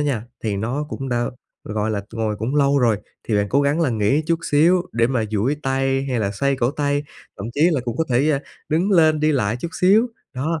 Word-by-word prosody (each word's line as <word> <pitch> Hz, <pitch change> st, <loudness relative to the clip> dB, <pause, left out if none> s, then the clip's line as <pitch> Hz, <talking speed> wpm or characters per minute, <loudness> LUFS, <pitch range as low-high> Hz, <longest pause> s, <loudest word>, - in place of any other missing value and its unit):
nha 135 Hz, -7 st, -1 dB, 0.2 s
thì 105 Hz, -3 st, -1 dB
nó 125 Hz, +8 st, -2 dB
cũng 135 Hz, -3 st, -5 dB
đã, 120 Hz, -1 st, 0 dB, 0.4 s
gọi 105 Hz, +1 st, -2 dB
là, 105 Hz, -, -1 dB
ngồi 110 Hz, -2 st, -2 dB
cũng 115 Hz, +7 st, -3 dB
lâu 140 Hz, 0 st, +3 dB
rồi, 115 Hz, -4 st, +3 dB, 0.3 s
thì 110 Hz, -, +1 dB
bạn 100 Hz, 0 st, +1 dB
cố 140 Hz, +5 st, +2 dB
gắng 145 Hz, +4 st, +1 dB
là 150 Hz, -6 st, +2 dB
nghỉ 110 Hz, +7 st, +1 dB
chút 165 Hz, 0 st, +1 dB
xíu 170 Hz, +5 st, +4 dB
để 115 Hz, 0 st, +2 dB
mà 125 Hz, -4 st, 0 dB
duỗi 115 Hz, +8 st, 0 dB
tay 135 Hz, 0 st, 0 dB
hay 125 Hz, -, 0 dB
là 100 Hz, -2 st, 0 dB
xoay 140 Hz, +6 st, 0 dB
cổ 120 Hz, -1 st, +1 dB
tay, 145 Hz, 0 st, -1 dB, 0.4 s
thậm 100 Hz, -, -5 dB
chí 145 Hz, -, -2 dB
là 140 Hz, -, +1 dB
cũng 120 Hz, 0 st, -3 dB
có 160 Hz, -, +1 dB
thể, 135 Hz, +5 st, +2 dB
ờ, 140 Hz, -, +2 dB, 0.3 s
đứng 170 Hz, +7 st, +1 dB
lên 155 Hz, -4 st, +4 dB
đi 155 Hz, 0 st, +3 dB
lại 115 Hz, -5 st, 0 dB
chút 170 Hz, -, -3 dB
xíu. 205 Hz, +6 st, +5 dB, 0.3 s
Đó, 155 Hz, +5 st, -2 dB
135 Hz, 240 wpm, -21 LUFS, 115-150 Hz, 0.4 s, xíu